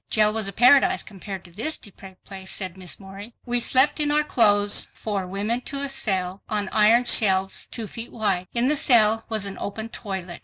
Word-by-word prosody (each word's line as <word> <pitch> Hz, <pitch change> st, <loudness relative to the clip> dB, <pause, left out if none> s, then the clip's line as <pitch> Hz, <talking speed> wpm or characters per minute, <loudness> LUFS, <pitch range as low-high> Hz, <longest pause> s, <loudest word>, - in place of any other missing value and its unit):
"Jail 215 Hz, -1 st, +3 dB
was 220 Hz, -2 st, 0 dB
a -, -, 0 dB
Paradise 250 Hz, +7 st, +3 dB
compared 195 Hz, -2 st, -10 dB
to 175 Hz, -, -16 dB
this 230 Hz, -, -1 dB
depraved 190 Hz, -2 st, -13 dB
place," 190 Hz, -1 st, -8 dB
said 185 Hz, -3 st, -1 dB
Miss 185 Hz, -2 st, -6 dB
Morey. 200 Hz, +4 st, -12 dB
"We 245 Hz, -1 st, 0 dB
slept 260 Hz, +5 st, +3 dB
in 295 Hz, -1 st, 0 dB
our 300 Hz, +1 st, +1 dB
clothes, 205 Hz, -7 st, +3 dB
four 200 Hz, -4 st, -5 dB
women 205 Hz, +6 st, -3 dB
to 280 Hz, -, -3 dB
a 280 Hz, -, -3 dB
cell, 190 Hz, -8 st, -2 dB
on 205 Hz, -2 st, -2 dB
iron 225 Hz, +3 st, +3 dB
shelves 195 Hz, -5 st, +3 dB
two 230 Hz, -, -5 dB
feet 230 Hz, +3 st, -8 dB
wide. 195 Hz, -5 st, -2 dB
In 240 Hz, +1 st, 0 dB
the 300 Hz, -, +2 dB
cell 225 Hz, -5 st, +3 dB
was 215 Hz, -3 st, 0 dB
an 195 Hz, -1 st, -4 dB
open 220 Hz, +2 st, -6 dB
toilet. 190 Hz, -6 st, -7 dB
210 Hz, 200 wpm, -22 LUFS, 195-235 Hz, -, Jail